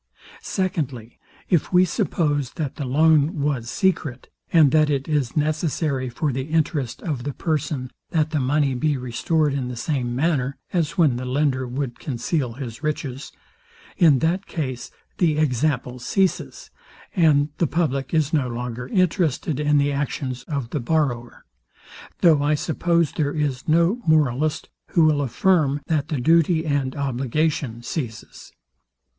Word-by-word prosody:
Secondly, 145 - -3 0.3
if 170 -5 +1
we 180 0 +5
suppose, 150 - -1
that 150 -6 -4
the 145 - -3
loan 155 +3 +3
was 140 -5 -1
secret, 155 -9 -1 0.2
and 155 -5 +6
that 155 0 +4
it 140 -2 -1
is 145 -4 -1
necessary 150 -3 0
for 145 +4 -1
the 130 +1 -3
interest 155 -5 -1
of 145 -8 -3
the 145 +1 -3
person, 145 -5 -2 0.2
that 155 -2 0
the 155 - 0
money 140 +1 +1
be 145 +3 0
restored 140 +5 0
in 135 -3 -2
the 125 - -5
same 120 -1 -2
manner 135 -2 0 0.2
(as 170 -1 0
when 150 -8 +3
the 130 - -4
lender 130 -1 0
would 125 -1 -4
conceal 130 -1 -2
his 120 -1 -7
riches) 145 -3 -4 0.6
in 155 -5 +5
that 185 +4 0
case 130 -6 -4 0.3
the 160 -4 +2
example 130 -3 0
ceases, 190 +9 -1 0.4
and 150 -5 +4
the 170 - +2
public 140 -5 -1
is 155 -2 +1
no 145 -5 +2
longer 125 0 -5
interested 165 -5 0
in 150 0 +2
the 145 0 +2
actions 135 -2 -3
of 140 -7 -4
the 150 - -1
borrower; 120 -3 -1 0.8
though 160 -5 +5
I 150 +1 +2
suppose 170 +1 +1
there 145 -2 -1
is 145 -4 -2
no 170 +9 +3
moralist, 150 -1 +2 0.3
who 165 - +5
will 150 -2 +3
affirm, 145 - +2
that 155 -3 0
the 150 -5 -2
duty 165 +4 +3
and 140 -3 -1
obligation 135 -2 -1
ceases. 120 -6 -6
145 Hz, 150 wpm, -23 LUFS, 130-160 Hz, 0.8 s, and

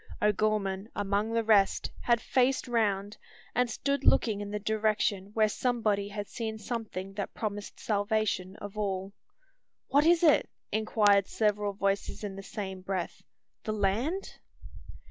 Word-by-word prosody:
O'Gorman, 210 -1 +1
among 205 +2 0
the 230 0 +2
rest, 210 -3 +3
had 235 -1 +3
faced 260 +3 +1
round; 210 -4 0 0.3
and 250 0 +2
stood 280 +4 -1
looking 210 -3 +3
in 205 - -5
the 210 - -2
direction 210 -2 0
where 215 -1 +4
somebody 215 -3 0
had 205 0 -5
seen 220 -2 -4
something 215 -4 -5
that 200 -1 -5
promised 205 -2 -4
salvation 205 -3 0
of 205 0 -8
all. 195 -2 -2 0.8
"What 290 +3 +4
is 345 0 +5
it?" 310 -3 +5 0.2
inquired 205 -2 +3
several 210 -2 0
voices 200 +1 -1
in 200 -2 -4
the 195 - -7
same 190 -2 -6
breath, 185 -2 -3 0.4
"the 215 - -2
land?" 220 - -1
210 Hz, 140 wpm, -30 LUFS, 200-225 Hz, 0.8 s, is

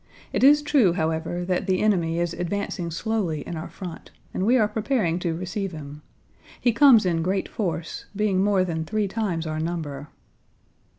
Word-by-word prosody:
It - - 0
is 295 +2 +7
true, 270 - +4
however, 165 +2 -2
that 185 +1 -1
the 185 -1 +2
enemy 170 -6 +1
is 175 -1 -1
advancing 175 0 -3
slowly 170 -3 -2
in 175 - -6
our 160 +1 -6
front, 180 -3 -9 0.2
and 190 - -1
we 250 +2 +5
are 215 -4 +3
preparing 210 -5 0
to 170 -2 -1
receive 185 +2 -4
him. 150 -1 -8 0.6
He 240 - +2
comes 235 -4 +6
in 170 -2 +1
great 190 +3 -1
force, 170 -6 -4
being 195 -2 +1
more 200 -2 +3
than 165 -3 -2
three 215 +4 -1
times 190 -6 -2
our 155 0 -3
number." 155 -4 -4
180 Hz, 175 wpm, -24 LUFS, 165-210 Hz, 0.6 s, is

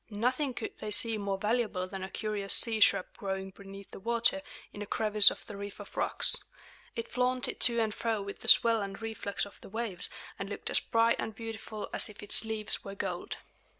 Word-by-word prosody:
Nothing 250 +5 -1
could 235 - -7
they 215 - -5
see 220 +1 +2
more 200 -1 -2
valuable 210 -3 -1
than 195 0 -7
a 190 - -6
curious 205 -2 0
sea 225 -2 +4
shrub 200 - +4
growing 190 -1 -4
beneath 195 0 -12
the - - -10
water, 235 +6 +2 0.3
in 205 - -9
a 205 - -6
crevice 215 -1 +8
of - - -9
the. 205 - -9
reef 200 0 -8
of - - -12
rocks. - - +2 0.6
It 230 - -4
flaunted 250 0 -1
to 235 -1 +4
and 220 -2 0
fro 225 -1 -2
with 200 0 -7
the - - -11
swell 230 -2 +5
and 195 -1 -6
reflux 220 -3 -3
of 200 - -16
the - - -12
waves, 215 -3 -1 0.3
and - - -5
looked - - -6
as - - +3
bright 230 0 +1
and 220 - -4
beautiful 220 -1 -7
as - - -1
if 210 0 -12
its 205 - +3
leaves 220 -1 -1
were 195 0 -8
gold. 185 -3 -5
215 Hz, 210 wpm, -30 LUFS, 200-230 Hz, 0.6 s, crevice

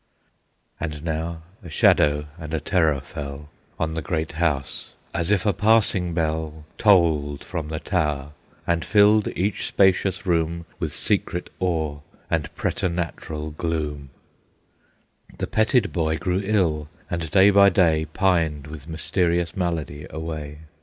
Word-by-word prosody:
And 75 -2 -4
now 80 0 -3 0.2
a 90 - -10
shadow 75 -1 +3
and 80 -1 -4
a - - 0
terror 80 -8 +1
fell 70 0 -8 0.3
On 80 0 -1
the 80 - -2
great 80 +1 -2
house, 75 -4 -2 0.2
as 85 +1 -1
if 105 -2 +2
a 105 - +3
passing 105 -5 +2
bell 80 -2 -2
Tolled 80 -8 +3
from 85 -4 -4
the 80 0 -4
tower, 75 -7 -1 0.3
and 85 -1 +1
filled 105 0 +5
each 100 +2 -1
spacious 95 0 +2
room 85 -1 0
With 80 -5 -2
secret 90 0 0
awe, 80 -5 -1 0.3
and - - 0
preternatural 85 -4 -3
gloom; 75 -3 -3 1.3
The - - -2
petted 110 0 +2
boy 80 -2 0
grew 90 +2 -1
ill, 85 -8 +1 0.2
and 85 -2 -3
day 95 +5 +6
by 100 0 +7
day 80 -4 +3
Pined 80 -3 +1
with 75 -1 -9
mysterious 85 +1 0
malady 80 -5 -3
away. 75 -1 -6
80 Hz, 135 wpm, -23 LUFS, 75-90 Hz, 1.3 s, by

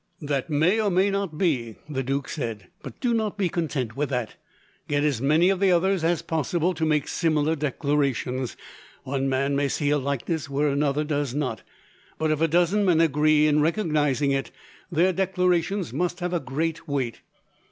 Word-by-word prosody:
"That 140 0 -2
may 160 +8 +2
or 210 - +1
may 190 +2 +2
not 195 -6 -2
be," 125 - 0
the 140 -3 -2
duke 135 +1 -2
said, 110 - -5
"but - - -10
do 245 -3 +1
not 215 -2 -1
be 190 -4 +1
content 145 -9 -2
with 145 0 -1
that. 125 -4 -3 0.5
Get 145 0 +1
as 140 -6 0
many 155 +6 +4
of 195 -1 +1
the 195 -1 +4
others 185 0 +2
as 170 0 +1
possible 165 +3 0
to 160 -1 -1
make 150 -2 +1
similar 160 -2 +1
declarations. 140 -3 -1 0.5
One 135 0 -1
man 135 +1 0
may 140 0 +1
see 145 +2 0
a 145 - +2
likeness 140 +3 -2
where 145 +2 +1
another 140 +1 +1
does 145 -4 -2
not, 130 -6 -2 0.6
but 155 0 0
if 155 0 -1
a 165 - +4
dozen 175 +5 +2
men 175 -4 +3
agree 155 -1 +4
in 150 0 +3
recognizing 150 - +1
it, 135 -1 -1 0.4
their 175 +3 +3
declarations 180 - 0
must 175 +4 -1
have 180 0 -2
a 175 - +1
great 160 +4 -3
weight. 135 -5 -2
150 Hz, 185 wpm, -25 LUFS, 140-175 Hz, 0.6 s, many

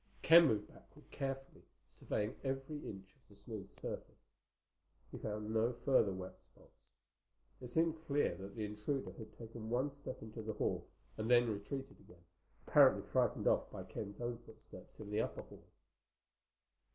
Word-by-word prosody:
Ken 165 +1 +9
moved 105 -4 +1
backward 150 - -18
carefully, 135 -1 -4 0.3
surveying 105 +1 -2
every 135 +2 -2
inch 95 -1 -9
of 135 - -33
the 100 - -16
smooth 100 -1 -7
surface. - - -7 0.9
He - - -6
found 105 0 -3
no 115 +2 +3
further 130 -7 +5
wet 95 0 -6
spots. - - -24 0.7
It 125 - -5
seemed 160 +4 +1
clear 140 -10 +2
that 95 +1 -8
the 110 -2 -2
intruder 105 +7 -2
had 110 -2 -9
taken 115 -1 -7
one 130 +4 +1
step 140 -3 -7
into 110 +1 -7
the 110 0 -3
hall 105 - -1 0.3
and 110 +1 -2
then 120 -2 +6
retreated 135 +7 -5
again, 85 -1 -18 0.4
apparently - - +7
frightened - - +2
off - - +3
by - - -6
Ken's 100 -1 -6
own 120 -1 -2
footsteps 110 -2 -14
in 105 -1 -7
the 105 +1 +2
upper - - -3
hall. - - -15
115 Hz, 160 wpm, -37 LUFS, 105-135 Hz, 0.9 s, Ken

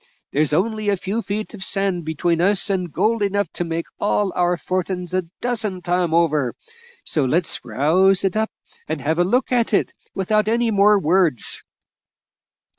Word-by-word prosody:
There's 150 +1 +1
only 215 +6 0
a 200 - +1
few 200 +5 -3
feet 215 +1 -4
of 200 -3 -6
sand 190 -4 -1
between 165 +2 0
us 200 +2 +4
and 180 -3 -2
gold 215 +7 +1
enough 200 0 0
to 175 - -2
make 165 0 -3
all 205 -2 0
our 175 0 +1
fortin's 180 0 -3
a 185 - +2 0.2
dozen 215 -7 -2
times 175 -2 0
over, 150 -7 +1 0.5
so 150 - 0
let's 160 +6 0
rouse 185 +7 +2
it 195 0 0
up 220 0 0 0.4
and 155 -1 -3
have 155 +5 -1
a - - +5
look 250 +10 0
at 235 -3 +2
it, - - 0 0.2
without 210 +2 +1
any 230 +1 +1
more 205 0 +5
words." 175 -6 +1
185 Hz, 170 wpm, -21 LUFS, 170-210 Hz, 0.5 s, a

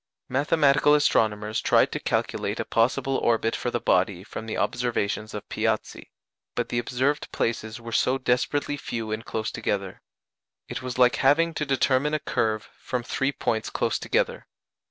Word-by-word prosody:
Mathematical 145 +1 +4
astronomers 110 -6 +1
tried - - +4
to - - -3
calculate - - -1
a - - -1
possible 130 +3 +1
orbit 115 -1 +1
for 125 - -2
the 120 - -1
body 90 -2 +1
from 110 +2 -7
the 110 - -3
observations 110 -3 -1
of 105 - -7
Piazzi, - - -2 0.5
but - - -1
the 120 - 0
observed 130 +5 -1
places 115 0 -2
were 115 0 -8
so 130 +3 +2
desperately 135 +3 0
few 115 -5 -4
and 110 +1 -3
close 110 -1 -3
together. 100 -4 -3 0.7
It - - -5
was 125 -1 -5
like 125 -1 +5
having 165 +5 +3
to 150 -2 -3
determine 140 +2 +2
a - - 0
curve 110 -7 -1
from 125 -1 -3
three 135 +3 0
points 110 -5 -1
close - - -1
together. - - -1
120 Hz, 160 wpm, -26 LUFS, 110-135 Hz, 0.7 s, like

